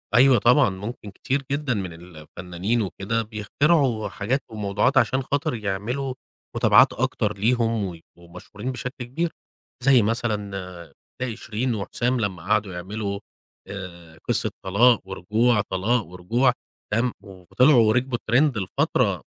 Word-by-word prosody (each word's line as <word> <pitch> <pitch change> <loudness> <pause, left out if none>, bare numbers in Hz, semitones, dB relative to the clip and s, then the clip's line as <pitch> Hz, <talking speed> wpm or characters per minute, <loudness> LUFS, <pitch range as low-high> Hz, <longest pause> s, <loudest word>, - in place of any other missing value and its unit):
أيوَه 130 0 +7
طبعًا، 125 +1 +5
ممكن 100 +2 -7
كتير 135 +6 -2
جدًا 140 -3 0
من 95 -5 -4
الفنانين 90 +6 -4
وكده 105 +3 -2
بيخترعوا 115 +2 +1
حاجات 120 +8 -2
وموضوعات 105 +5 0
عشان 130 0 +3
خاطر 145 +1 -1
يعملوا 110 +6 -3 0.4
متابعات - - +5
أكتر 105 -1 -1
ليهم، 115 0 +1
ويبقوا 85 0 -12
مشهورين 105 +7 -6
بشكل 125 +1 -6
كبير، 165 +7 -2 0.5
زي 130 -3 +6
مثلًا 100 - -3 0.3
زي 120 -4 -2
شيرين 120 0 -2
وحسام 120 +5 -1
لمّا 95 -6 -3
قعدوا 100 -1 0
يعملوا 100 +3 -4 0.5
آآ، 85 -4 -9
قصة - - 0
طلاق 110 +5 +4
ورجوع، 105 +4 +1
طلاق 105 +4 0
ورجوع، 115 +9 +1 0.4
تمام، 120 +3 +1
وطلعوا 110 - +3
وركبوا 120 +2 +1
الTrend 125 +2 +2
لفترة 95 -2 0
110 Hz, 125 wpm, -24 LUFS, 95-125 Hz, 0.5 s, أيوَه